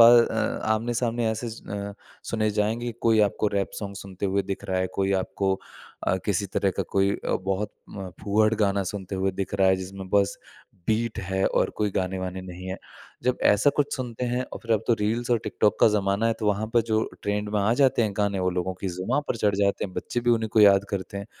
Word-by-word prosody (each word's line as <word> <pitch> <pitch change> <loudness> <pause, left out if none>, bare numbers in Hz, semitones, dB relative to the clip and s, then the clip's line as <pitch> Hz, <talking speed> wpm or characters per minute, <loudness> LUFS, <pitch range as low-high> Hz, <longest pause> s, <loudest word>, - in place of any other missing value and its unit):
अ, 115 -1 +6
आमने-सामने 115 +1 0
ऐसे 110 +2 -3
ज़ 115 - -9
अ, 100 0 -4 0.4
सुने 110 -1 +1
जाएँगे, 110 +3 -1
कोई 115 -2 +4
आपको 105 - -2
रैप 100 -1 0
सॉन्ग 100 -2 -6
सुनते 95 0 -5
हुए 100 +1 +1
दिख 100 +1 -3
रहा 95 -2 -1
है, 95 - +1
कोई 95 0 +1
आपको 95 0 -1 0.5
अ, 95 - +3
किसी 100 -1 +1
तरह 100 0 0
का - - +3
कोई 100 0 +4
अ, - - -3
बहुत 95 +2 -1 0.2
म 95 -2 -6
फूहड़ 110 +2 +3
गाना 100 -2 +1
सुनते 100 -1 -5
हुए 95 +1 +1
दिख 95 +1 -4
रहा 95 -1 +4
है, 95 - +4
जिसमें 95 +1 -7
बस 100 -1 +2 0.5
बीट 110 +1 0
है 95 +1 -1
और - - +1
कोई 105 -1 +1
गाने-वाने 95 0 -2
नहीं 90 0 -8
हैं। 95 - -4 0.4
जब 125 0 +1
ऐसा 105 +8 +5
कुछ 145 0 +1
सुनते 125 -2 -4
हैं 125 +1 -1
और - - -5
फिर 115 - 0
अब 110 - +1
तो 120 - +4
रील्स 115 +4 0
और 120 - +4
टिकटॉक 105 - +1
का - - +8
ज़माना 100 +1 +1
है, 115 - +3
तो 110 - -4
वहाँ 105 +1 +1
पे 120 - +5
जो 110 0 +1 0.2
ट्रेंड 105 0 -1
में 105 - +3
आ 100 +3 +3
जाते 130 -2 +4
हैं 105 - 0
गाने, 100 -2 +1
वो 90 0 +1
लोगों 90 +1 -2
की 95 - -2
ज़ुबाँ 95 +11 -1
पर - - 0
चढ़ 105 -3 +2
जाते 100 -1 +1
हैं, 95 - -6
बच्चे 120 - -2
भी 120 - +2
उन्हीं 115 -2 +2
को 110 - +4
याद 100 -1 +7
करते 100 0 -4
हैं। 100 - -6
100 Hz, 230 wpm, -26 LUFS, 95-115 Hz, 0.5 s, का